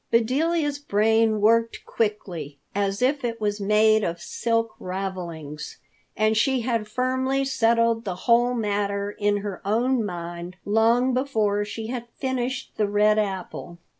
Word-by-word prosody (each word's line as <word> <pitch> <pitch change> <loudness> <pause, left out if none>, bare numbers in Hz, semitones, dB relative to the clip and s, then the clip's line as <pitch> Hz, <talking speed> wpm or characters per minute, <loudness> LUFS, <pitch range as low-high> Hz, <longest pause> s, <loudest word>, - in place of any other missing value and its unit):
Bedelia's 290 +6 +1
brain 220 -3 +2
worked 230 +2 +2
quickly, 180 -10 -3 0.2
if 205 +8 0
it 230 -1 -2
was 205 -1 -1
made 215 +1 +4
of 170 -1 -2
silk 230 -1 -1
ravelings! 175 -6 -5 0.4
And 215 +1 +2
she 260 +3 +2
had 230 -3 -1
firmly 260 +3 0
settled 230 -3 +2
the 190 -5 -3
whole 240 +1 +4
matter 205 -2 -1
in 205 0 0
her 200 -3 -5
own 235 +4 +1
mind 175 -2 -6
long 230 +4 +3
before 220 -6 +1
she 220 +2 -6
had 240 -1 -4
finished 260 -1 -2
the 210 - +2
red 210 +1 +3
apple. 190 -4 -4
220 Hz, 135 wpm, -24 LUFS, 200-245 Hz, 0.4 s, made